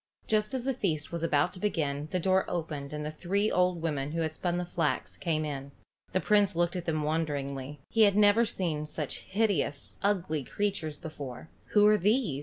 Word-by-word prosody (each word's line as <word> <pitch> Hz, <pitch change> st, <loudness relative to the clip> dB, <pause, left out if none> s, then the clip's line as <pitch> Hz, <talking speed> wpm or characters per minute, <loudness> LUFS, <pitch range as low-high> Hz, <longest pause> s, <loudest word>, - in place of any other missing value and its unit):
Just 215 Hz, +2 st, +1 dB
as 255 Hz, -, -2 dB
the 270 Hz, +1 st, 0 dB
feast 160 Hz, -, -2 dB
was 170 Hz, -1 st, -3 dB
about 165 Hz, +1 st, +2 dB
to -, -, -8 dB
begin 150 Hz, -7 st, -1 dB
the 185 Hz, -, -1 dB
door 190 Hz, +1 st, +3 dB
opened 155 Hz, -5 st, -3 dB
and 150 Hz, 0 st, -4 dB
the 150 Hz, -, -3 dB
three 195 Hz, +6 st, 0 dB
old 180 Hz, -2 st, +2 dB
women 145 Hz, -2 st, -1 dB
who 165 Hz, -, 0 dB
had 160 Hz, -1 st, -1 dB
spun 175 Hz, +2 st, -1 dB
the 180 Hz, -, -1 dB
flax 165 Hz, -3 st, -1 dB
came 155 Hz, -3 st, -1 dB
in. 140 Hz, -2 st, -5 dB, 0.4 s
The 185 Hz, -, +2 dB
Prince 205 Hz, -2 st, +3 dB
looked 175 Hz, +1 st, +1 dB
at 175 Hz, -1 st, -3 dB
them 155 Hz, -2 st, 0 dB
wonderingly. 145 Hz, -3 st, -2 dB
Never 210 Hz, 0 st, +6 dB
had 235 Hz, -, +2 dB
he -, -, -1 dB
seen 155 Hz, -5 st, -2 dB
such 150 Hz, -2 st, -4 dB
hideous, 190 Hz, -8 st, -1 dB
ugly 175 Hz, -7 st, 0 dB
creatures 165 Hz, -3 st, -2 dB
before. 145 Hz, -2 st, -8 dB, 0.2 s
"Who 210 Hz, -1 st, +6 dB
are 210 Hz, 0 st, +6 dB
these?" 205 Hz, -, +2 dB
165 Hz, 200 wpm, -30 LUFS, 150-200 Hz, 0.4 s, Never